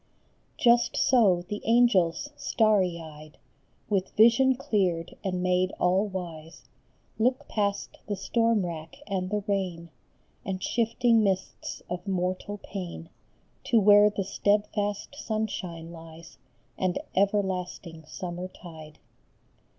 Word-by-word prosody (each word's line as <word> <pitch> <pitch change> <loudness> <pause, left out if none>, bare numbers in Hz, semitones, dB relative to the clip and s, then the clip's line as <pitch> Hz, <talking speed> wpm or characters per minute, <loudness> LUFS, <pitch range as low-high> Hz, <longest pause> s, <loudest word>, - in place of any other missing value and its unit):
Just 240 -1 +3
so 200 -9 +4
the 210 +2 -5
angels, 230 - +3
starry 200 -10 +2
eyed, 155 -1 -12 0.5
With 195 -3 -2
vision 235 +4 +6
cleared 185 -9 -1
and 180 -2 -2
made 185 0 +2
all 185 +4 +1
wise, 170 -4 -8 0.5
Look 255 +3 +1
past 200 -2 -2
the 205 - -1
storm 225 +1 +1
rack 165 -2 -7
and 185 -2 -2
the 210 0 -1
rain 180 -5 -2 0.5
And 190 -2 -4
shifting 230 0 +2
mists 190 -2 -2
of 180 +2 -6
mortal 185 +2 -2
pain 175 -4 -7 0.6
To 235 - +4
where 205 0 +7
the 205 -1 -3
steadfast 205 +2 -1
sunshine 200 - -4
lies, 165 +1 -12 0.4
And 185 -1 0 0.2
everlasting 185 -4 -1
summer 180 +1 -5
tide. 160 -4 -12
190 Hz, 110 wpm, -27 LUFS, 175-210 Hz, 0.6 s, where